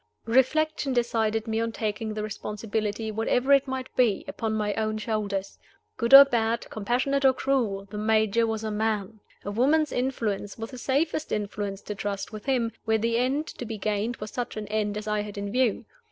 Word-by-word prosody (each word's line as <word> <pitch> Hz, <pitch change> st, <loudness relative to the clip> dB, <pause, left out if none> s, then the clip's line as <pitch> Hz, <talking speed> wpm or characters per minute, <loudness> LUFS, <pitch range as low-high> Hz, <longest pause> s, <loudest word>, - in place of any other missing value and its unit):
Reflection 270 Hz, +4 st, +2 dB
decided 225 Hz, -2 st, +1 dB
me 220 Hz, 0 st, 0 dB
on 230 Hz, 0 st, -1 dB
taking 215 Hz, 0 st, -3 dB
the 215 Hz, -, -3 dB
responsibility, 215 Hz, +1 st, -3 dB
whatever 245 Hz, +5 st, +2 dB
it 275 Hz, -1 st, +4 dB
might 260 Hz, -1 st, -5 dB
be, 235 Hz, -6 st, +2 dB
upon 225 Hz, -2 st, -3 dB
my 210 Hz, -1 st, 0 dB
own 215 Hz, 0 st, -1 dB
shoulders. 205 Hz, -3 st, -3 dB, 0.4 s
Good 235 Hz, -1 st, -1 dB
or 275 Hz, +1 st, +12 dB
bad, 235 Hz, -3 st, 0 dB
compassionate 250 Hz, +6 st, 0 dB
or 265 Hz, -1 st, +6 dB
cruel, 240 Hz, -7 st, 0 dB
the 210 Hz, +1 st, -7 dB
Major 220 Hz, +1 st, +2 dB
was 220 Hz, -1 st, -2 dB
a 215 Hz, -, -2 dB
man. 215 Hz, -1 st, -1 dB, 0.3 s
A 205 Hz, -, -3 dB
woman's 290 Hz, +8 st, +2 dB
influence 220 Hz, -6 st, -2 dB
was 225 Hz, +2 st, -6 dB
the 255 Hz, -, -8 dB
safest 300 Hz, +5 st, 0 dB
influence 205 Hz, -1 st, -3 dB
to 210 Hz, -, -4 dB
trust 200 Hz, +1 st, -4 dB
with 215 Hz, -1 st, -8 dB
him, 245 Hz, -4 st, +1 dB
where 220 Hz, -1 st, +2 dB
the 230 Hz, +1 st, +1 dB
end 270 Hz, +5 st, 0 dB
to -, -, -8 dB
be 225 Hz, -2 st, -5 dB
gained 210 Hz, +3 st, -1 dB
was 210 Hz, -1 st, -7 dB
such 245 Hz, -3 st, -4 dB
an 215 Hz, -, -4 dB
end 210 Hz, -1 st, -1 dB
as 210 Hz, 0 st, -6 dB
I 210 Hz, 0 st, 0 dB
had 205 Hz, -1 st, -7 dB
in 200 Hz, 0 st, -4 dB
view. 250 Hz, -2 st, +1 dB
220 Hz, 195 wpm, -26 LUFS, 210-250 Hz, 0.4 s, or